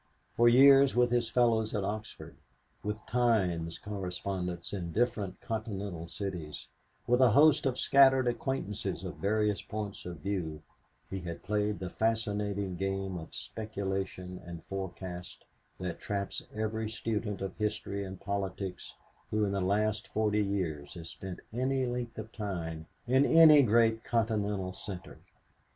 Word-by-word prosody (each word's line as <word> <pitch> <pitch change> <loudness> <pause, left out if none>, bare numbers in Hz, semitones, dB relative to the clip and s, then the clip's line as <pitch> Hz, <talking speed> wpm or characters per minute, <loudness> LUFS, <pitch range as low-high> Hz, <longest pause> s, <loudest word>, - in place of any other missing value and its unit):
For 120 0 +6
years 135 +2 +7
with 120 0 +4
his 120 -2 +2
fellows 115 -2 +2
at 100 - 0
Oxford, 105 +2 -5 0.5
with 105 +1 -4
Times 95 -9 +1
correspondents 90 -3 -4
in 90 -4 -3
different 105 -3 0
continental 100 -6 -4
cities, 85 -5 -5 0.4
with 125 +2 +3
a 130 - +7
host 145 +5 +5
of 130 -1 -1
scattered 135 -2 +5
acquaintances 120 -3 -2
of - - -6
various 105 0 +1
points 105 -3 -5
of 85 -4 -7
view, 80 -5 -3 0.4
he 95 - -4
had 85 -2 -6
played 105 0 0
the 90 -1 -5
fascinating 105 -4 -1
game 95 0 -2
of 80 - -10
speculation 95 -4 -4
and 85 -1 -8
forecast 95 -2 -6 0.3
that 90 -2 -4
traps 100 -1 -3
every 110 0 -2
student 110 -2 -2
of 95 -1 -4
history 105 -2 -2
and 95 -1 -7
politics 100 -2 -4 0.3
who 105 0 +1
in 100 - -1
the 100 -1 0
last 105 +3 +1
forty 105 -1 +1
years 85 -8 -2
has 85 -1 -8
spent 95 -2 -7
any 130 +2 +1
length 120 -1 -3
of 115 - -6
time 85 -6 -4 0.2
in 130 +3 +4
any 155 -1 +8
great 115 -1 +3
continental 105 -5 0
center. 95 -1 -6
105 Hz, 140 wpm, -31 LUFS, 95-115 Hz, 0.5 s, any